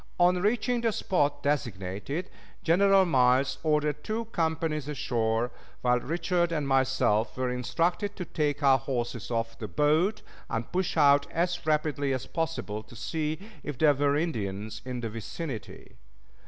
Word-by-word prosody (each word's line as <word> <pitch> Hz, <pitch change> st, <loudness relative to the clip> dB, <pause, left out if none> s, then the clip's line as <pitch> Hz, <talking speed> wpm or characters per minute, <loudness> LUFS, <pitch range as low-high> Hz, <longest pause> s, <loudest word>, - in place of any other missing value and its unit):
On 180 Hz, +1 st, +5 dB
reaching 235 Hz, +4 st, +1 dB
the 230 Hz, -1 st, +2 dB
spot 145 Hz, -8 st, 0 dB
designated, 120 Hz, -, -2 dB, 0.3 s
General 195 Hz, +3 st, +5 dB
Miles 130 Hz, -2 st, +3 dB
ordered 150 Hz, -1 st, +1 dB
two 225 Hz, +2 st, -2 dB
companies 160 Hz, -3 st, -1 dB
ashore, 120 Hz, -5 st, 0 dB, 0.3 s
while 125 Hz, 0 st, +3 dB
Richard 170 Hz, +4 st, 0 dB
and 150 Hz, -4 st, -1 dB
myself 130 Hz, -5 st, +2 dB
were 130 Hz, -1 st, 0 dB
instructed 170 Hz, -, -1 dB
to 180 Hz, -, -5 dB
take 145 Hz, -2 st, -1 dB
our 135 Hz, -1 st, +6 dB
horses 120 Hz, -3 st, -3 dB
off 115 Hz, -1 st, -2 dB
the 110 Hz, -, -4 dB
boat 155 Hz, -, +2 dB, 0.3 s
and 115 Hz, 0 st, -3 dB
push 185 Hz, -2 st, -1 dB
out 140 Hz, -1 st, +5 dB
as 175 Hz, +1 st, 0 dB
rapidly 150 Hz, -3 st, +1 dB
as 130 Hz, -, -3 dB
possible 160 Hz, -10 st, -3 dB
to 110 Hz, +2 st, -15 dB
see 150 Hz, +8 st, -2 dB, 0.2 s
if 145 Hz, -4 st, -5 dB
there 150 Hz, +2 st, +5 dB
were 145 Hz, +1 st, +2 dB
Indians 110 Hz, -, -3 dB
in 125 Hz, -1 st, -4 dB
the 115 Hz, -, -3 dB
vicinity. 115 Hz, +3 st, -7 dB
145 Hz, 145 wpm, -28 LUFS, 120-165 Hz, 0.3 s, our